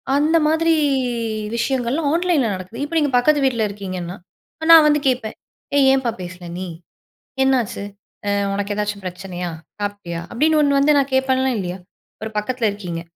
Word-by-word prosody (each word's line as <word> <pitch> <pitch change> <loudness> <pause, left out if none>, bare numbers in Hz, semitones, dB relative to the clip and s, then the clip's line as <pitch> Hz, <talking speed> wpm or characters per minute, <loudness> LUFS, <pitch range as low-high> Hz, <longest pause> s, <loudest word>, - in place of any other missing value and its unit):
அந்த 305 +3 +3
மாதிரி 325 +1 +3 0.8
விஷயங்கள்லாம் 265 +4 0
ஆன்லைன்ல 335 -7 +2
நடக்குது. 185 +7 -7
இப்ப 310 +3 -4
நீங்க 295 -2 +2
பக்கத்து 295 +4 +3
வீட்ல 240 -4 +1
இருக்கீங்கன்னா, 185 -3 -6 0.6
நான் 320 -2 +10
வந்து 295 0 +3
கேப்பேன். 245 -4 -1 0.4
"ஏய்! 275 -2 +5
ஏன்ப்பா 265 -3 +1
பேசல 180 0 -8
நீ? 185 0 -4 0.8
என்னாச்சு? 260 -6 +1 0.5
அ - - +2 0.2
உனக்கு 200 +1 -2
ஏதாச்சும் 210 -1 -3
பிரச்சனையா? 180 -1 -5 0.3
சாப்பிட்டியா?" 205 -5 -4
அப்படீன்னு 305 +6 +2
ஒண்ணு 280 -1 +3
வந்து 290 +2 +4
நான் 275 0 0
கேப்பேன்ல, 265 0 +2
இல்லியா? 180 -1 -4 0.4
ஒரு 220 - -4
பக்கத்துல 235 +2 -1
இருக்கீங்க. 180 -5 -5
240 Hz, 145 wpm, -20 LUFS, 195-285 Hz, 0.8 s, நான்